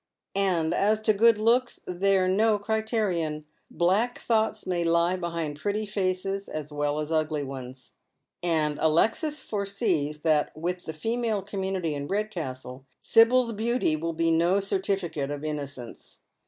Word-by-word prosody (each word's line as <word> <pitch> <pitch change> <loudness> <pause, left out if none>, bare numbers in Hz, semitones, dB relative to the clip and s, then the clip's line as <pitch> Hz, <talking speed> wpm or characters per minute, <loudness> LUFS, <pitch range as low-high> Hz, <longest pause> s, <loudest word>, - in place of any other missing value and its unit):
And 180 -5 +1
as 210 +2 +2
to 215 0 +4
good 225 +1 +5
looks, 235 +3 +2
they're 185 +1 +2
no 210 +3 +3
criterion. 205 -8 -1 0.2
Black 205 +8 +1
thoughts 220 -2 0
may 180 -2 0
lie 170 +2 +2
behind 170 -4 -4
pretty 210 +4 -1
faces 195 -1 -2
as 150 -1 -6
well 145 0 -1
as 155 +1 -4
ugly 155 -2 0
ones." 130 -1 -9 0.5
And 155 -4 0
Alexis 225 - +1
foresees 195 -8 -1
that, 155 -1 +1
with 180 +3 -3
the 160 - -5
female 225 +3 -1
community 190 -4 -2
in 140 0 -4
Red 210 +4 -1
castle, 130 -6 -6
Sibyl's 235 +1 +4
beauty 225 -5 0
wiU 165 +1 -4
be 165 0 +2
no 170 +4 +3
certificate 190 -7 -1
of 145 0 -5
innocence. 140 -5 -6
180 Hz, 140 wpm, -27 LUFS, 155-210 Hz, 0.5 s, good